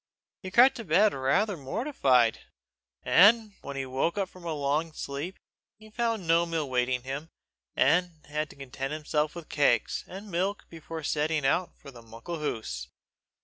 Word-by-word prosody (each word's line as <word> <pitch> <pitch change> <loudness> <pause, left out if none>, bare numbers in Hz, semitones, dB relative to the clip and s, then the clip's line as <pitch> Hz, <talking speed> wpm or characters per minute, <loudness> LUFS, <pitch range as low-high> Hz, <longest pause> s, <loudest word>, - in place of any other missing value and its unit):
He 190 - -6
crept 245 +7 +6
to 230 - -6
bed 200 +4 +4
rather 140 +10 +1
mortified. 135 - +1 0.6
When 205 -6 +4
he 135 -1 -3
woke 130 +6 -1
from 185 -1 -16
a 165 - -2
long 150 +3 -1
sleep, 145 +6 -5 0.4
he 215 0 -16
found 225 -4 -1
no 165 +1 +3
meal 165 -3 -2
waiting 125 -1 0
him, 140 +5 -5 0.5
and 175 -2 +2
had 150 +1 -3
to - - -14
content 135 +1 -5
himself 150 0 -1
with 170 -2 -8
cakes 140 -5 +1
and 200 +2 -9
milk 190 +4 -1
before 165 -1 -7
setting 150 0 0
out 175 +6 0
for 140 - -12
"the 120 -3 -13
Muckle 115 +9 -7
Hoose." 90 - -4
155 Hz, 155 wpm, -28 LUFS, 135-185 Hz, 0.6 s, crept